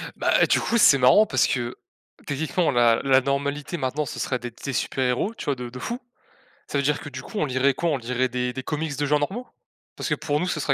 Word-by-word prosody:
Bah - - +3
du - - +3
coup 235 - 0
c'est 140 -10 +7
marrant 130 +13 +6
parce 130 -9 +2
que 120 -2 -2 0.5
techniquement, 155 +4 0
la 120 -2 +4
la 135 -1 +4
normalité 140 +4 -2
maintenant 145 +2 -2
ce - - -6
serait 125 - -1
d'être 120 0 -9
des 140 - -3
super 130 - -1
héros 125 - 0
tu - - -8
vois 140 -2 0
de 125 -1 -6
de 125 +1 -9
fou. 240 - -4 0.7
Ça 140 - -2
veut 140 - +1
dire 145 +1 +1
que - - -9
du 130 -1 -7
coup 215 - -9
on 155 - +2
lirait 135 +1 +2
quoi? 170 +5 -1
On 145 - +1
lirait 125 +1 -1
des 125 0 -2
des 130 +1 -5
comics 150 -1 -3
de 145 - 0
gens 150 +1 +2
normaux? 210 +12 -3 0.5
Parce - - -4
que - - +2
pour 150 -1 -1
nous 180 - -1
ce 155 - -2
serait 140 -1 +1
140 Hz, 255 wpm, -24 LUFS, 125-150 Hz, 0.7 s, c'est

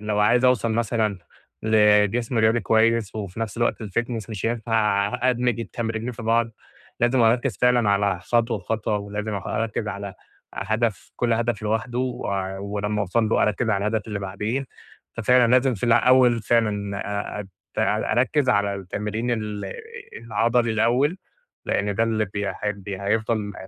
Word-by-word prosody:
لو 105 0 -2
عايز 120 +4 +4
أوصل 120 -3 +3
مثلًا 110 -3 0 0.4
لجسم 110 +2 +3
رياضي 110 +1 +3
كويس، 110 0 +2
وفي 105 -1 -6
نفس 115 -1 -3
الوقت 120 0 0
الFitness 115 +1 -3
مش 110 0 -3
هينفع 110 -2 0
أدمج 125 -1 0
التمرينين 115 +2 -4
في 115 0 -9
بعض 115 +1 +2 0.5
لازم 120 +2 +3
أركز 120 0 +2
فعلًا 120 -4 +3
على 100 -2 +1
خطوة 115 +1 +1
بخطوة 105 +2 -2
ولازم 105 +1 -4
أخ 95 - -5
أركز 110 -1 -2
على 100 -1 -6 0.4
هدف 110 -2 -2
كل 120 -1 +1
هدف 115 -1 0
لوحده، 110 +3 -1
و 130 -1 -2 0.3
ولما 105 +1 -2
أوصل 110 +3 +1
له - - +2
أركز 110 +2 +1
على 100 0 0
الهدف 110 -1 -1
اللي 105 -1 -3
بعديه، 105 +7 -3 0.5
ففعلًا 120 +1 +4
لازم 130 0 +4
في 100 - -4
الأول 120 0 +5
فعلًا 105 -3 0 0.4
أ - - -2
أ 100 - -8 0.3
أر - - +1
أركز 130 +2 +2
على 100 -2 +2
التمرين 105 +5 -3
ال 105 -3 -3 0.5
العضلي 115 +2 +1
الأول 125 - +2 0.5
لأن 100 0 0
ده 110 - +1
اللي 110 -1 0
بي 100 0 -4
ه - - -3 0.3
هيفضل 105 +2 -1
110 Hz, 150 wpm, -23 LUFS, 105-120 Hz, 0.5 s, الأول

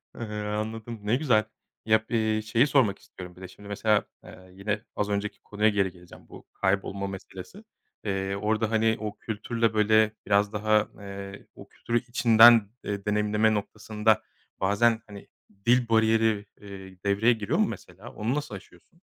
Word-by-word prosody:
Eee, - - -10 0.3
anladım. 110 +2 -4
Ne 105 +3 +1
güzel. 125 -6 +2 0.4
Ya, 110 0 +4
b - - -1 0.2
eee, 110 - -1
şeyi 115 +5 +2
sormak 125 -9 +2
istiyorum 90 -1 -12
bir 90 - -15
de 95 - -7
şimdi 105 +2 -14
mesela, 105 +1 +1 0.2
eee, 95 0 -14
yine 105 +2 -3
az 105 0 -1
önceki 100 +1 -3
konuya 105 +1 +1
geri 100 -3 0
geleceğim, 90 -1 -16
bu - - -13
kaybolma 100 0 -1
meselesi. 95 - -10 0.4
Eee, 95 -1 -2
orada, 110 +2 -1
hani, 110 0 +2
o 105 -1 -5
kültürle, 115 +1 -2
böyle, 110 0 +4
biraz 100 +1 +2
daha, 105 0 +2
eee 100 0 -9
o - - -13
kültürü 120 0 -2
içinden, 115 -3 +6
eee, 100 -1 -4
deneyimleme 105 +1 +2
noktasında, 105 +1 0 0.4
bazen, 110 +4 +2
hani, 100 -1 -11 0.4
dil 120 0 +3
bariyeri, 110 -1 +2 0.2
eee, 95 -2 -11
devreye 100 +5 +3
giriyor 105 -3 -2
mu 215 - +3
mesela, 95 - -9
onu 115 +6 -2
nasıl 145 -8 -4
aşıyorsun? 95 - -16
105 Hz, 160 wpm, -26 LUFS, 100-110 Hz, 0.4 s, içinden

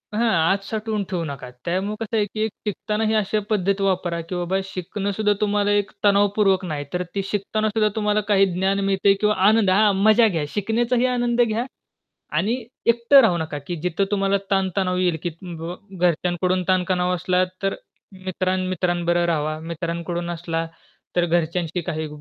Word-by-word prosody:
हां, 230 +2 +2 0.2
आत 195 0 0
साठवून 215 -1 -2
ठेवू 180 -3 -2
नका. 140 -4 -7 0.2
त्यामुळे 190 +4 -1
कसं 225 0 -2
आहे 210 - +2
की 215 +2 -6
एक 220 - -4 0.2
शिकतानाही 215 +2 -1
अशा 215 0 +1
पद्धत 200 -2 +1
वापरा, 180 -3 0
की 170 +2 -6
बाबा 175 +2 -1
शिकणं 190 +2 -4
सुद्धा 210 +1 +1
तुम्हाला 205 0 +2
एक 205 -1 +1
तणावपूर्वक 200 -1 +3
नाही, 150 -4 -4
तर 180 0 0
ती 195 - +1
शिकताना 215 +2 -1
सुद्धा 215 0 +2
तुम्हाला 210 -1 +1
काही 195 -1 +5
ज्ञान 190 +2 +1
मिळतंय 195 0 +3
किंवा 210 0 +3
आनंद 215 -2 +4
हां, 205 +2 +4
मजा 220 +2 +6
घ्या, 165 -7 -1
शिकण्याचाही 235 +4 +1
आनंद 240 0 +1
घ्या. 230 0 +1 0.7
आणि 235 +4 0 0.2
एकटं 235 +4 +6
राहू 210 -7 +3
नका 155 -2 -4
की 175 - -3
जिथं 180 +2 0
तुम्हाला 195 -1 +2
ताणतणाव 190 -1 +1
येईल, 175 -3 +1
की 175 - -2
बाबा 170 -1 -6 0.3
घरच्यांकडून 180 +2 0
ताणतणाव 180 -1 +1
असला, 180 +1 +1 0.2
तर 195 0 0 0.5
मित्रां 185 0 -1
मित्रांबरोबर 175 -1 0
राहावं. 155 -1 -1
मित्रांकडून 170 +1 -3
असला 165 -1 -3 0.5
तर 175 - +4
घरच्यांशी 170 +1 0
काही 155 -1 -3
190 Hz, 165 wpm, -22 LUFS, 175-210 Hz, 0.7 s, मजा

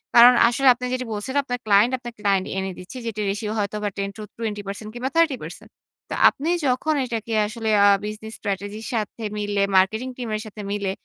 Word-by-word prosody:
কারণ 240 +1 +10
আসলে 265 +3 +1
আপনি 250 +1 -6
যেটা 255 0 -2
বলছেন 215 +6 -4
আপনার 245 -2 -3
ক্লায়েন্ট, 210 +3 +5
আপনার 240 -1 -8
ক্লায়েন্ট 200 -2 +1
এনে 190 0 -2
দিচ্ছে, 180 +8 -9
যেটির 215 -2 -3
ratio 210 +2 -3
হয়তো 205 0 -1 0.2
10-20% 205 0 -5
কিংবা 250 +2 -3
30%। 320 -6 0 0.4
তো - - -4 0.2
আপনি 305 +5 -4 0.2
যখন 260 +5 +1
এটাকে 230 -2 -4
আসলে 220 0 -4 0.2
আ - - +7 0.2
business 215 +1 -6
strategy 205 +1 -4
র - - -8
সাথে 220 0 -3
মিলে, 205 -1 -1 0.2
marketing 220 +7 +2
team 245 -3 -5
এর 215 - -3
সাথে 215 0 -9
মিলে 200 -2 -1
215 Hz, 180 wpm, -23 LUFS, 205-245 Hz, 0.4 s, কারণ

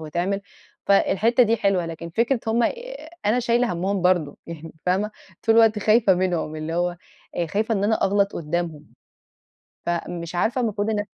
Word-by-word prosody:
وتعمل، 175 +6 -2 0.5
فالحتة 215 +5 +4
دي 230 0 +3
حلوة 190 -5 +1
لكن 165 0 -7
فكرة 230 +5 +1
هُم 230 +2 +2 0.6
أنا 235 +4 +3
شايلة 240 -1 +1
همّهُم 190 +2 -1
برضه، 175 -5 +2
يعني 165 -1 -8
فاهمة 195 +4 +1 0.3
طول 225 -1 +3
الوقت 225 -2 +5
خايفة 215 -1 +4
منهم 175 -4 -1
اللي 155 +2 -4
هو 175 0 0 0.4
آآ 170 - 0
خايفة 220 +6 0
إن 200 0 0
أنا 220 +1 +1
أغلط 200 +1 +2
قدامهم، 165 -1 -3 1.0
فمش 170 0 -3
عارفة 235 +8 +1
المفروض 210 -2 -1
إن 215 -1 0
أنا 205 - -2
195 Hz, 160 wpm, -23 LUFS, 170-220 Hz, 1.0 s, الوقت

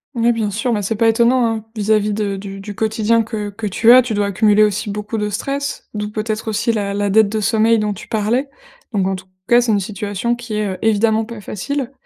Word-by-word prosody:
Ouais 235 0 +3
bien 220 -3 -1
sûr, 225 +4 -1
mais 205 -1 -1
c'est 225 +3 -1
pas 225 +2 +2
étonnant, 235 +2 +3
hein, 225 -1 -3
vis-à-vis 210 0 +1
de 205 -1 -2
du 195 0 -7
du 205 0 -8
quotidien 220 +1 +1
que 215 -2 -4
que 210 +2 -7
tu 225 +4 +4
as, 255 +1 +8
tu 240 -2 -3
dois 205 -1 0
accumuler 210 +1 +3
aussi 210 0 0
beaucoup 210 +2 -4
de 210 - -1
stress, 280 +6 -4
d'où 210 0 -3
peut-être 215 +1 -3
aussi 220 +2 0
la 200 -2 -2
la 205 0 0
dette 215 0 +4
de 220 - -2
sommeil 220 +1 +3
dont 210 -1 -1
tu - - -11
parlais. 230 +6 0 0.5
Donc 190 -2 +1
en 190 - -1
tout 185 - -10 0.2
cas, 240 0 +6
c'est 240 -2 +1
une 205 - +2
situation 205 +3 -2
qui 235 -2 -8
est, 210 -1 0
heu, 185 - -4
évidemment 220 0 +2
pas 225 -2 -9
facile. 265 +7 -4
215 Hz, 240 wpm, -18 LUFS, 205-230 Hz, 0.5 s, as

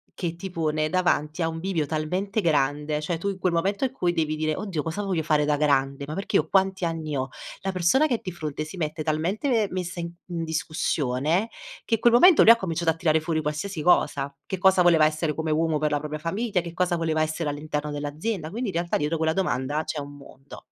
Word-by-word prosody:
che 170 -2 -3
ti 190 +2 -7
pone 155 -2 0
davanti 175 -3 0
a 165 - +2
un 165 0 -4
bivio 170 -3 -1
talmente 180 +7 -2
grande," 150 -2 +1
cioè 165 +2 -2
tu 200 +5 -2
in 195 -1 -5
quel 185 -1 +1
momento 195 +7 0
in 260 - -2
cui 180 -9 0
devi 155 -2 0
dire: 155 0 -1
"Oddio 185 -7 -3
cosa 165 +5 -3
voglio 190 -5 -1
fare 150 -1 +2
da 145 0 +1
grande, 140 -1 +1
ma 150 - -5
perché 195 +5 -4
io 155 - +3
quanti 190 -1 +2
anni 160 -3 -3
ho?" 130 0 -2 0.3
La 195 - -2
persona 185 - +3
che 270 -6 +1
è - - -4
di 185 - -5
fronte 155 -3 -4
si 155 +5 -9
mette 155 -1 -3
talmente 195 - 0
messa 180 -1 -4
in 170 0 -5 0.2
in 170 -2 -3
discussione, 160 - -1 0.3
che 225 - +1
i - - -6
quel 235 +1 +4
momento 335 +7 +7
lui 230 - +9
ha - - +8
cominciato 170 -5 0
a - - -5
tirare 160 -1 +2
fuori 160 0 -1
qualsiasi 155 +4 -3
cosa, 140 -4 +2
che 190 - -4
cosa 190 -1 +5
voleva 165 -3 +5
essere 155 0 0
come 160 +1 -3
uomo 160 0 +1
per 150 0 +1
la 145 - +2
propria 150 +1 -5
famiglia, 195 +5 -1
che 170 -1 -8
cosa 180 0 +1
voleva 160 -2 0
essere 155 0 -2
all'interno 150 0 -3
dell'azienda, 155 +5 -3
quindi 235 +2 -3
in 185 - -6
realtà 170 0 0
dietro 150 +3 -1
quella 160 0 +1
domanda 150 -4 -1
c'è 155 - -4
un 145 0 -8
mondo. 140 0 -14
165 Hz, 230 wpm, -25 LUFS, 150-185 Hz, 0.3 s, lui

